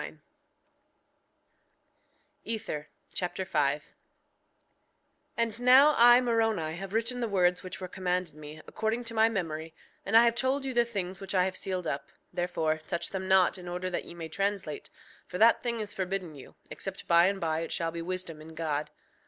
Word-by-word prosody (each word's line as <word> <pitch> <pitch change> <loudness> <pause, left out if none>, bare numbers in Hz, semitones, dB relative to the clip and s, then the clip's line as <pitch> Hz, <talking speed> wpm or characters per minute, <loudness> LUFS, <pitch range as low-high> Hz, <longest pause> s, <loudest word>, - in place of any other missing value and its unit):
Amen. - - -8 2.2
Ether 210 -10 -3 0.2
Chapter 185 +1 -2
5 145 -5 +1
5:1 - - -26 1.5
And 230 -1 -1
now 260 +5 +7
I, 240 +1 +8
Moroni, 225 -9 +1
have 195 +2 -7
written 230 +3 -1
the 235 - -1
words 180 -3 +2
which 185 -1 -7
were 185 - -5
commanded 180 -2 -2
me, 155 +1 -10
according 220 +2 -2
to 230 -1 -7
my 220 0 +4
memory; 165 -6 -4 0.3
and 220 +3 +4
I 230 - +8
have 235 - +4
told 265 +3 0
you 265 - -2
the 240 0 +3
things 190 -5 -4
which 195 0 -4
I 180 -1 +4
have 185 0 -3
sealed 185 -2 -3
up; 140 -3 -3 0.2
therefore 160 -3 -1
touch 170 -2 -3
them 190 -1 -4
not 190 -1 +4
in 180 - -10
order 180 +1 -3
that - - -3
ye 170 - -11
may 165 -1 -6
translate; 195 -3 -3 0.4
for 180 - -5
that 225 +3 +5
thing 235 -1 -2
is 210 -1 -4
forbidden 185 -3 -3
you, 140 -3 -13 0.2
except - - -5
by 170 +1 +6
and 195 0 -1
by 160 -2 0
it 165 - -4
shall 165 -1 -1
be 170 0 -5
wisdom 175 -3 -5
in 160 +1 -12
God. 150 -2 -2
185 Hz, 185 wpm, -29 LUFS, 165-225 Hz, 2.2 s, I